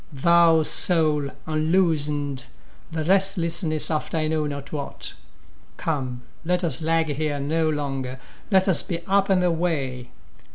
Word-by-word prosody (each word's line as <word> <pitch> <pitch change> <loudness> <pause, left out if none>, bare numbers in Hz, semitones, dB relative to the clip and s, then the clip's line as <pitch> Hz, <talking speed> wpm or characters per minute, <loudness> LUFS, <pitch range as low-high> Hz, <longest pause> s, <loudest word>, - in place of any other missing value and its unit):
Thou, 165 +2 +4
soul, 155 -4 +2 0.2
unloosen'd 155 -4 0 0.5
the 160 -1 -2
restlessness 170 -3 +1
after 155 +1 -2
I 155 -1 0
know 155 -1 0
not 140 0 -7
what; 145 -2 -5 0.6
Come, 130 -6 -3 0.2
let 180 +2 0
us 165 -2 +3
lag 165 0 +1
here 145 0 -2
no 160 +3 0
longer, 135 -4 -3 0.3
let 190 -2 +3
us 185 - +5
be 170 -1 -5
up 195 +1 +2
and 185 -2 +3
away! 155 -8 -1
155 Hz, 130 wpm, -23 LUFS, 145-170 Hz, 0.6 s, us